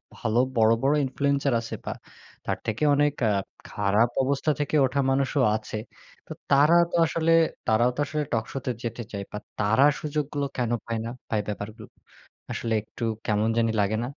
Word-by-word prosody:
ভাল 110 -2 -3 0.2
বড়, 110 0 +5
বড় 140 +2 +4
ইনফ্লুয়েন্সার 140 0 0
আছে 115 - -6
বা - - -2 0.5
তার - - -1
থেকে 110 +6 -2
অনেক 145 0 +3 0.2
আ - - +3 0.4
খারাপ 105 +4 +2
অবস্থা 140 +3 +1
থেকে 145 +1 -1
ওঠা 135 +2 -1
মানুষও 135 0 +1
আছে। 110 0 -6 0.5
তো - - -13 0.2
তারা 145 +4 +5 0.2
তো - - -2
আসলে 165 +1 0 0.4
তারাও 120 +2 +4
তো - - -8
আসলে 150 +1 -2
টকশোতে 125 +3 -2
যেতে 120 0 -4
চায় 100 -1 -4
বা 105 - -5 0.2
তারা 110 +6 +3 0.2
সুযোগগুলো 145 -1 -2
কেনো 120 -1 0
পায় 115 -1 -2
না? - - -3 0.2
তাই 110 -2 +1
ব্যাপারগুলো 105 +1 -6 0.6
আসলে 115 -1 -2
একটু 110 +2 -9 0.2
কেমন 105 0 +1
জানি 115 -1 +2
লাগে 100 +2 +1
না? - - -2
120 Hz, 170 wpm, -26 LUFS, 110-140 Hz, 0.6 s, বড়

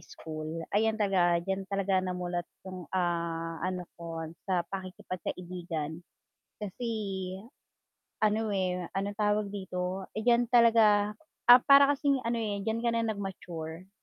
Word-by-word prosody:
school, 155 -1 -7 0.2
ayan 220 +1 +2
talaga 185 -5 +3
diyan 195 0 -3
talaga 195 -1 +1
namulat 180 -1 -3 0.2
yung, 185 -2 -8
ah, 170 -2 -1
ano 180 0 -2 0.2
ko 165 -1 -5 0.2
sa 180 -2 +2
pakikipagkaibigan 180 -3 -5 0.6
kasi 210 +4 -5 1.3
ano, 215 0 +2
eh, 180 -2 -1
anong 200 +2 -2
tawag 210 0 +1
dito, 190 -1 -4
eh, 215 - -3
diyan 240 +1 +4
talaga 220 -3 +6 0.4
ah, 245 +1 +11
para 280 0 +8
kasi 285 0 +2
ano, 235 0 -1
eh, 205 -3 -2
diyan 225 +3 -2
ka - - +4
na 230 - +1
nag-mature. 185 -5 -5
190 Hz, 130 wpm, -30 LUFS, 175-215 Hz, 1.3 s, ah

